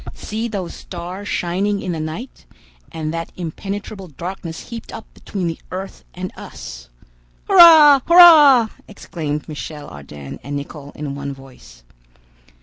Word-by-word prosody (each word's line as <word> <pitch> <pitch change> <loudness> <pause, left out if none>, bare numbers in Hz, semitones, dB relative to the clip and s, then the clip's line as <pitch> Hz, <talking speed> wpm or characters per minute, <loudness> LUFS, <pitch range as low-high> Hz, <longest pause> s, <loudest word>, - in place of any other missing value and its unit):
See 220 +2 -4
those 195 -6 -5
stars 180 +3 -8
shining 195 +4 -1
in 185 - -4
the 165 - -4
night, 160 +12 -7 0.4
and 160 -1 -4
that 165 0 -5
impenetrable 195 +3 -6
darkness 170 +2 -8
heaped 230 -1 -8
up 225 - -9
between 190 -3 -5
the 165 -1 -3
earth 190 - -7
and - - -5
us!" - - -10 0.6
"Hurrah! 320 -7 +8
hurrah!" 305 -9 +8 0.2
exclaimed 155 -7 -5
Michel 150 -1 -7
Ardan 70 -1 -10
and 145 +2 -5
Nicholl 140 0 -7
in 145 -2 -5
one 140 0 -5
voice. 125 - -16
175 Hz, 135 wpm, -19 LUFS, 150-210 Hz, 0.6 s, Hurrah